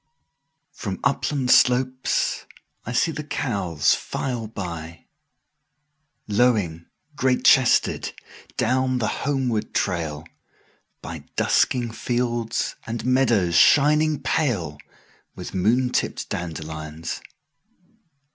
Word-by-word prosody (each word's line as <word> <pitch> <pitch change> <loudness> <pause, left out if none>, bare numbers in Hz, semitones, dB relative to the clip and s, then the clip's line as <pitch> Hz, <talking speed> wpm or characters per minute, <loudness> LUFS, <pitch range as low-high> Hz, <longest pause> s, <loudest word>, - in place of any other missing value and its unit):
1From 95 -2 -4
upland 135 -1 0
slopes 130 +1 +2 0.4
I - - -3
see 125 +6 +2
the 150 -1 -5
cows 100 - 0
file 120 -4 -3 1.8
by,2Lowing, 105 -7 +1 0.3
great 130 -2 +1
chested, 130 -2 +4 0.5
down 130 +2 +1
the 110 -3 0 0.2
homeward 125 -6 -1
trail,3By 80 -5 -6
dusking 120 -3 +2
fields 120 0 -2
and 115 +1 -4
meadows 120 -9 +2
shining 150 - +5
pale4With 95 - -4
moon 120 +7 +2
tipped - - -2
dandelions. 80 -1 -5
120 Hz, 80 wpm, -23 LUFS, 90-130 Hz, 1.8 s, shining